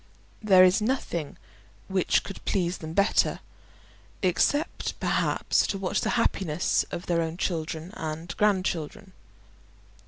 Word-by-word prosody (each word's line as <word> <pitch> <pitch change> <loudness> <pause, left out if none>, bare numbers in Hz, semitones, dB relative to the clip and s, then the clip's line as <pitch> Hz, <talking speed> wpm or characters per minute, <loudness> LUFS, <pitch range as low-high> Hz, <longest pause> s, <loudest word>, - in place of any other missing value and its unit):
There 190 -4 +6
is 185 +3 +4
nothing 210 - -2 0.5
which 190 -2 +1
could 195 - -9
please 180 -2 -1
them 160 0 -7
better, 200 +4 +2 0.8
except 185 - 0
perhaps - - +1
to 195 - -2
watch 190 -1 -1
the - - -1
happiness 175 -8 +1
of 170 - -6
their 170 -1 +1
own 165 +1 -3
children 165 0 -3
and 160 +2 -5
grandchildren. 190 -1 -1
180 Hz, 120 wpm, -27 LUFS, 165-195 Hz, 0.8 s, There